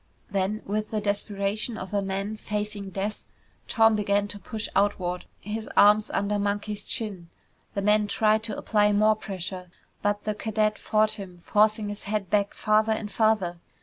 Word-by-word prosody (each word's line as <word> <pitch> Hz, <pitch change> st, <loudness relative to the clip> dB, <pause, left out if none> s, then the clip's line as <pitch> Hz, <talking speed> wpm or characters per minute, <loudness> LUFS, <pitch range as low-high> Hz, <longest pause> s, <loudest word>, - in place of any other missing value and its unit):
Then, 200 Hz, +2 st, -1 dB
with 210 Hz, +2 st, -2 dB
the 215 Hz, -, -1 dB
desperation 205 Hz, +2 st, -1 dB
of 190 Hz, +1 st, -7 dB
a 200 Hz, -, +2 dB
man 195 Hz, +2 st, -3 dB
facing 210 Hz, -1 st, -4 dB
death, 200 Hz, +3 st, -4 dB, 0.4 s
Tom 225 Hz, -2 st, +4 dB
began 205 Hz, -1 st, +1 dB
to 205 Hz, -, -7 dB
push 220 Hz, +2 st, -4 dB
outward, 185 Hz, -3 st, +1 dB
his 215 Hz, +1 st, -5 dB
arms 210 Hz, +1 st, +6 dB
under 205 Hz, +1 st, 0 dB
Monkey's 205 Hz, +1 st, -2 dB
chin. 200 Hz, -8 st, -3 dB, 0.5 s
The 200 Hz, -, -1 dB
man 210 Hz, 0 st, +3 dB
tried 215 Hz, +1 st, +2 dB
to 215 Hz, -, -3 dB
apply 210 Hz, -1 st, +2 dB
more 215 Hz, +1 st, +4 dB
pressure 185 Hz, -3 st, -5 dB, 0.3 s
but 205 Hz, 0 st, 0 dB
the 215 Hz, -, -1 dB
cadet 215 Hz, 0 st, 0 dB
fought 215 Hz, 0 st, +2 dB
him, 180 Hz, -3 st, -9 dB
forcing 215 Hz, 0 st, +3 dB
his 205 Hz, 0 st, -7 dB
head 205 Hz, -3 st, -2 dB
back 205 Hz, -1 st, +1 dB
farther 215 Hz, +1 st, +3 dB
and 215 Hz, -1 st, -4 dB
farther. 205 Hz, -6 st, +1 dB
210 Hz, 165 wpm, -26 LUFS, 200-215 Hz, 0.5 s, arms